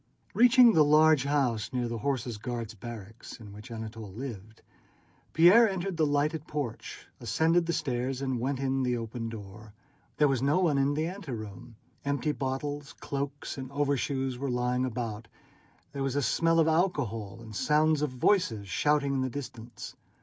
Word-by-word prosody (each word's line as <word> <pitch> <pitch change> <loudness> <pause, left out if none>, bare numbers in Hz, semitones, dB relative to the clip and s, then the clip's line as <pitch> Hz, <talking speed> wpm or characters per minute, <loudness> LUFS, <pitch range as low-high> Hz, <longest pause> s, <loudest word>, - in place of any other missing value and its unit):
Reaching 245 -1 +7
the 155 - +6
large 150 -1 +5
house 130 -7 0
near 125 -2 -1
the 115 -1 -4
Horse 125 -2 -2
Guards' 115 0 -5
barracks, 110 +1 -9
in 105 -3 -11
which 105 +5 -11
Anatole 110 -2 -7
lived, 110 -2 -8 0.7
Pierre 195 +8 +7
entered 190 -1 -3
the 160 -2 +2
lighted 150 +2 0
porch, 145 -7 -5
ascended 160 +9 +2
the 170 - 0
stairs, 130 -3 -2
and 130 -3 -2
went 130 +2 -1
in 135 0 0
at - - 0
the 125 -1 0
open 115 0 -5
door. 105 0 -10 0.4
There 150 - +5
was 135 -3 0
no 140 +4 +2
one 165 -7 +2
in 140 +1 +2
the 155 +1 0
anteroom; 120 - -7 0.3
empty 140 +2 0
bottles, 145 +1 -4
cloaks, 140 0 -5
and 130 0 -7
overshoes 140 -2 -1
were 140 0 -2
lying 125 +1 0
about; 115 -2 -4 0.6
there 140 - -5
was 135 -1 -1
a 145 - +1
smell 165 +8 +2
of 160 - +4
alcohol, 145 - 0
and 110 -2 -10
sounds 155 +4 +2
of 150 - +1
voices 130 - +2
and 100 -1 -10
shouting 145 +7 +1
in 135 - 0
the 130 - -1
distance. 120 -3 -8
135 Hz, 170 wpm, -29 LUFS, 115-150 Hz, 0.7 s, Reaching